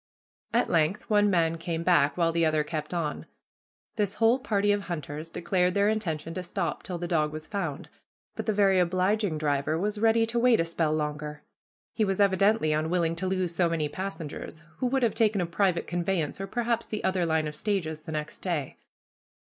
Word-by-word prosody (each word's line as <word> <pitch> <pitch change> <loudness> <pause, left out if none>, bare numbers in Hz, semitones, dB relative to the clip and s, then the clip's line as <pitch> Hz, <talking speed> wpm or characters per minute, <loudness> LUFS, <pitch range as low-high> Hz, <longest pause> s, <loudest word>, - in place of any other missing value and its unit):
At 235 +3 +2
length 165 +3 +1
one 205 0 +4
man 165 -3 +1
came 165 0 -3
back, 160 -5 +3
while 165 -1 +2
the 165 0 +1
other 155 -1 +2
kept 150 0 -4
on. 165 -4 -3 0.7
This 205 -1 0
whole 230 +4 +3
party 205 -5 +1
of 205 -1 0
hunters 155 -2 -5
declared 180 +1 0
their 200 +1 +3
intention 165 -7 -2
to 185 - -3
stop 180 0 -3
till 180 - -5
the 175 0 -4
dog 155 -3 +1
was 155 0 -6
found, 165 -7 -4 0.5
but - - -5
the - - +3
very 195 -2 +4
obliging 185 +1 +1
driver 150 0 0
was 210 +4 -1
ready 225 +1 +4
to 235 +1 -1
wait 240 -1 +4
a 165 - +2
spell 165 -2 0
longer. 150 -1 -3 0.5
He 220 - +1
was 195 -1 0
evidently 200 -4 +3
unwilling 165 +2 0
to 185 +3 -2
lose 185 -2 -1
so 175 -1 +2
many 160 -3 0
passengers, 160 -3 -6
who 255 - 0
would 265 +1 +1
have 225 -3 +2
taken 220 -2 +2
a 175 - +1
private 170 +1 +1
conveyance, 175 -1 -2
or 195 - -4
perhaps 235 0 -1
the 215 - -4
other 185 -1 +1
line 160 -2 +1
of 150 - -5
stages, 165 -5 -2
the 155 - -9
next 150 -1 -4
day. 165 -7 -3
175 Hz, 200 wpm, -27 LUFS, 160-205 Hz, 0.7 s, one